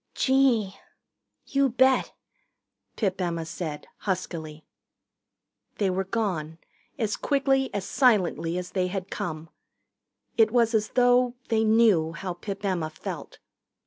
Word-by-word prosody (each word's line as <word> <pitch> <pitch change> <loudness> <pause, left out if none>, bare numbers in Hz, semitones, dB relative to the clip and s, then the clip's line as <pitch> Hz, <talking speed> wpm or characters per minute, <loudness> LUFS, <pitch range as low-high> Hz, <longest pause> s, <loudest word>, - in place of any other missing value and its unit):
"Gee, 255 -7 +2 0.7
you 275 -1 +2
bet," 260 +2 +3 0.8
Pip 195 -4 -1
Emma 170 -2 -2
said 160 -3 -5
huskily. 160 -5 -4 1.1
They 195 -3 +1
were 190 +1 -1
gone, 180 -7 -2 0.4
as 220 -2 -1
quickly, 270 -2 +1
as 200 -2 -3
silently 185 -9 +2
as 180 0 -5
they 185 -2 0
had 185 0 -5
come. 160 -1 -5 0.9
It 225 -1 +5
was 235 0 +2
as 215 -1 +1
though 245 0 +4
they 225 -1 +2
knew 215 -8 +4
how 180 +3 -4
Pip 195 +3 -6
Emma 175 -5 -1
felt. 155 - -7
195 Hz, 120 wpm, -26 LUFS, 175-235 Hz, 1.1 s, It